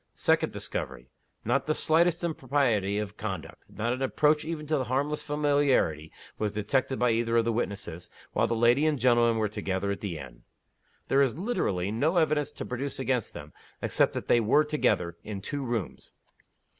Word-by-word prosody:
_ -, -, -33 dB
Second -, -, +2 dB
discovery: -, -, -5 dB, 0.3 s
Not 125 Hz, +6 st, +1 dB
the 155 Hz, -, +1 dB
slightest 170 Hz, +2 st, +2 dB
impropriety 130 Hz, -, 0 dB
of 105 Hz, 0 st, -4 dB
conduct, 95 Hz, -7 st, -6 dB
not 115 Hz, +3 st, -2 dB
an 130 Hz, -, -5 dB
approach 150 Hz, +3 st, +2 dB
even 155 Hz, -1 st, -4 dB
to 150 Hz, -3 st, 0 dB
harmless 140 Hz, +5 st, -1 dB
familiarity, 145 Hz, -, +1 dB, 0.3 s
was 105 Hz, -1 st, -1 dB
detected 130 Hz, +5 st, 0 dB
by 125 Hz, -1 st, +2 dB
either 115 Hz, 0 st, +1 dB
of 115 Hz, -, +3 dB
the 115 Hz, -, +1 dB
witnesses, 95 Hz, -6 st, -4 dB, 0.2 s
while -, -, +2 dB
the 115 Hz, -, 0 dB
lady 120 Hz, +6 st, +4 dB
and 155 Hz, -2 st, +1 dB
gentleman 120 Hz, -2 st, +3 dB
were 110 Hz, -1 st, +1 dB
together 100 Hz, -1 st, -2 dB
at 100 Hz, -, -4 dB
the 95 Hz, -6 st, -4 dB
inn. -, -, -10 dB, 0.7 s
There 135 Hz, -, +3 dB
is 135 Hz, -1 st, +1 dB
literally 105 Hz, -, -1 dB
no 150 Hz, -, +1 dB
evidence 155 Hz, -3 st, +2 dB
to -, -, -6 dB
produce 135 Hz, +2 st, -4 dB
against 130 Hz, -4 st, -1 dB
them, -, -, -9 dB, 0.3 s
except -, -, +1 dB
that -, -, -5 dB
they 120 Hz, -, +5 dB
were 115 Hz, +7 st, +4 dB
together 90 Hz, -, 0 dB
in 105 Hz, -2 st, -5 dB
two 145 Hz, +8 st, -4 dB
rooms. 120 Hz, -6 st, -4 dB
120 Hz, 180 wpm, -28 LUFS, 105-145 Hz, 0.7 s, they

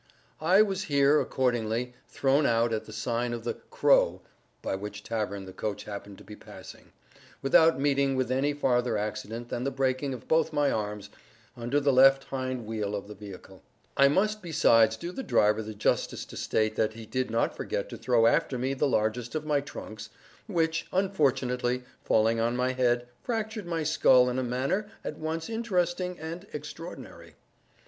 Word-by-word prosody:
I 185 Hz, +6 st, +6 dB
was 195 Hz, -1 st, -2 dB
here, 140 Hz, -1 st, +4 dB
accordingly, 120 Hz, -1 st, -1 dB, 0.2 s
thrown 140 Hz, +2 st, +2 dB
out 115 Hz, 0 st, +2 dB
at 110 Hz, -, -2 dB
the -, -, -11 dB
sign 120 Hz, +2 st, -2 dB
of 120 Hz, -1 st, -5 dB
the -, -, -2 dB
"Crow" -, -, +2 dB, 0.4 s
(by -, -, -2 dB
which 105 Hz, +2 st, -7 dB
tavern 105 Hz, -3 st, -3 dB
the 95 Hz, -, -10 dB
coach 105 Hz, +1 st, -4 dB
happened 100 Hz, -1 st, -8 dB
to -, -, -14 dB
be 105 Hz, +2 st, -10 dB
passing), -, -, -13 dB, 0.5 s
without 160 Hz, +2 st, +5 dB
meeting 140 Hz, -1 st, +2 dB
with 130 Hz, -1 st, -1 dB
any 135 Hz, +3 st, +1 dB
farther 125 Hz, -5 st, +1 dB
accident 110 Hz, +3 st, -4 dB
than 120 Hz, -, -3 dB
the 135 Hz, -, 0 dB
breaking 135 Hz, 0 st, -1 dB
of 120 Hz, -, -12 dB
both 160 Hz, -1 st, +2 dB
my 145 Hz, -1 st, +2 dB
arms, 105 Hz, -1 st, -4 dB, 0.4 s
under 120 Hz, +4 st, 0 dB
the 140 Hz, -1 st, +2 dB
left 135 Hz, +1 st, +6 dB
hind 130 Hz, -3 st, -4 dB
wheel 105 Hz, -2 st, -3 dB
of 100 Hz, 0 st, -5 dB
the 105 Hz, -, -8 dB
vehicle. 95 Hz, -2 st, -11 dB, 0.3 s
I 140 Hz, -, +6 dB
must 210 Hz, +8 st, +1 dB
besides 115 Hz, -9 st, +4 dB
do 170 Hz, +9 st, -5 dB
the 265 Hz, -, -5 dB
driver 105 Hz, -, +2 dB
the 110 Hz, 0 st, -7 dB
justice 105 Hz, -, 0 dB
to -, -, -12 dB
state 110 Hz, 0 st, 0 dB
that 110 Hz, 0 st, +1 dB
he 115 Hz, 0 st, -9 dB
did 130 Hz, +3 st, -2 dB
not 115 Hz, +1 st, 0 dB
forget -, -, -3 dB
to -, -, -7 dB
throw 120 Hz, -2 st, +3 dB
after 125 Hz, +2 st, +2 dB
me 130 Hz, +2 st, -1 dB
the 135 Hz, +2 st, +1 dB
largest 115 Hz, +2 st, -1 dB
of 155 Hz, -1 st, -2 dB
my 150 Hz, -2 st, +2 dB
trunks, 110 Hz, -6 st, -9 dB, 0.4 s
which, 165 Hz, -4 st, 0 dB
unfortunately 130 Hz, -9 st, 0 dB, 0.2 s
falling 115 Hz, +1 st, +2 dB
on 115 Hz, +1 st, +1 dB
my 125 Hz, +1 st, +1 dB
head, 120 Hz, -1 st, +1 dB
fractured 220 Hz, -4 st, -3 dB
my 165 Hz, -2 st, -1 dB
skull 130 Hz, -5 st, +4 dB
in 125 Hz, -, -1 dB
a -, -, -1 dB
manner 135 Hz, -, -1 dB
at 150 Hz, -, -6 dB
once 160 Hz, +1 st, -3 dB
interesting 180 Hz, -5 st, -1 dB
and 165 Hz, +5 st, -7 dB
extraordinary. 150 Hz, +4 st, -9 dB
130 Hz, 180 wpm, -28 LUFS, 115-155 Hz, 0.5 s, I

